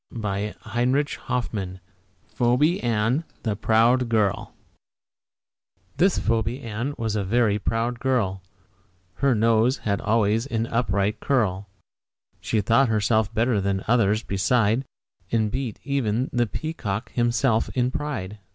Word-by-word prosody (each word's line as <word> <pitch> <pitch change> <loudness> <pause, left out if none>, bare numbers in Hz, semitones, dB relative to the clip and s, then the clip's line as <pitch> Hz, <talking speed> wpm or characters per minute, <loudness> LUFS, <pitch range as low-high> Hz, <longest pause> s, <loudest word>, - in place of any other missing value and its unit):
PHOEBE 105 -2 -3 2.3
ANN, 115 +5 +1 0.2
THE 110 -3 -1
PROUD 115 +4 +3
GIRL 105 -4 0 1.4
This 190 +2 +3
Phoebe 115 +2 0
Ann 120 +5 -4
was 110 -2 -2
a 105 - 0
very 105 +1 +2
proud 115 +3 -1
girl, 110 -8 0 0.8
Her 140 -3 +2
nose 115 +4 +3
had 100 -1 -2
always 110 +2 +1
an 115 -4 -1
upward 105 -4 0
curl. 100 -7 0 0.7
She 110 - 0
thought 115 +5 +3
herself 110 0 +1
better 115 -2 +1
than 95 0 -1
all - - -13
others 110 -2 +3
beside, 110 +5 +1 0.5
And 110 -2 +1
beat 130 -3 -4
even 130 -3 -1
the 120 -1 +2
peacock 115 -7 -4
himself 120 -1 +1
in 125 0 +1
pride. 110 -9 -4
115 Hz, 115 wpm, -24 LUFS, 105-125 Hz, 2.3 s, PROUD